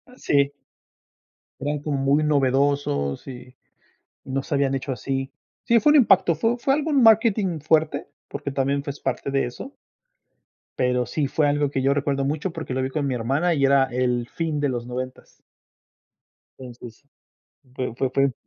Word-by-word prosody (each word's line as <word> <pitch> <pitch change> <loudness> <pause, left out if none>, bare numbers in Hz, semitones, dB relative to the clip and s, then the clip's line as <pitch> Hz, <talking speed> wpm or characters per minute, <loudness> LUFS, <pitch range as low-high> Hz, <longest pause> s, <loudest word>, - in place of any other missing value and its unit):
Sí 140 - +1 1.1
eran 145 +1 -2
como 145 -1 -2
muy 140 +3 +2
novedosos, 135 - +1
y 125 -1 -10 0.7
y - - -6
no 135 +1 0
se 145 - -3
habían 140 -1 +1
hecho 135 +1 -3
así. 135 +1 -3 0.3
Sí, 235 0 +4
fue 295 - +4
un 300 - +6
impacto, 195 -9 +5
fue 225 +10 0
fue 270 +3 +1
algún 290 -2 +2
marketing 215 -6 +4
fuerte, 155 -1 +1 0.2
porque - - -5
también 140 +1 0
fue 145 - -6
es 140 - -6
parte - - -3
de 135 0 +1
eso 195 - -8 1.0
pero 125 -1 +1
sí 150 - -1
fue 150 +2 +1
algo 145 -1 +1
que 135 - -1
yo 135 +1 +3
recuerdo 140 -1 0
mucho, 150 +6 -2
porque 160 -6 -5
lo 130 - 0
vi 130 - -2
con 145 -1 -1
mi 130 - -1
hermana 140 +9 0
y 140 -2 +2
era 135 0 +4
el 125 -1 -1
fin 160 -3 -2
de 145 -1 +1
los 120 -2 -3
noventas. 130 +1 -7 1.2
Entonces, 120 -1 -11 0.7
fue 125 -3 -3
fue 130 +1 0
fue 135 0 +2
140 Hz, 170 wpm, -23 LUFS, 130-155 Hz, 1.2 s, un